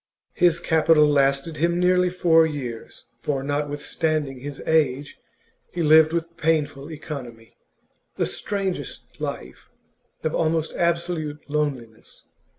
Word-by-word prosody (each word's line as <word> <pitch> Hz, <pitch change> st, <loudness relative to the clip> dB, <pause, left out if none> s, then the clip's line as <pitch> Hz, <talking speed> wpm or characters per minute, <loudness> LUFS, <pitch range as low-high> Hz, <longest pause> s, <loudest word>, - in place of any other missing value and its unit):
His 175 Hz, -1 st, +3 dB
capital 160 Hz, -2 st, +4 dB
lasted 140 Hz, +2 st, +1 dB
him 170 Hz, +2 st, +1 dB
nearly 180 Hz, 0 st, +3 dB
four 170 Hz, -2 st, +4 dB
years, 135 Hz, -8 st, -5 dB
for, 135 Hz, +3 st, -2 dB
notwithstanding 145 Hz, 0 st, -2 dB
his 140 Hz, +1 st, -7 dB
age, 145 Hz, -3 st, +1 dB, 0.5 s
he 175 Hz, -, -2 dB
lived 155 Hz, 0 st, +6 dB
with 170 Hz, 0 st, -3 dB
painful 155 Hz, -2 st, 0 dB
economy. 125 Hz, -7 st, -8 dB, 0.6 s
The -, -, 0 dB
strangest 190 Hz, -8 st, -4 dB
life, -, -, -6 dB, 0.5 s
of 155 Hz, -, -1 dB
almost 160 Hz, 0 st, 0 dB
absolute 170 Hz, -3 st, -2 dB
loneliness. 140 Hz, -7 st, -4 dB
155 Hz, 110 wpm, -23 LUFS, 145-165 Hz, 0.6 s, lived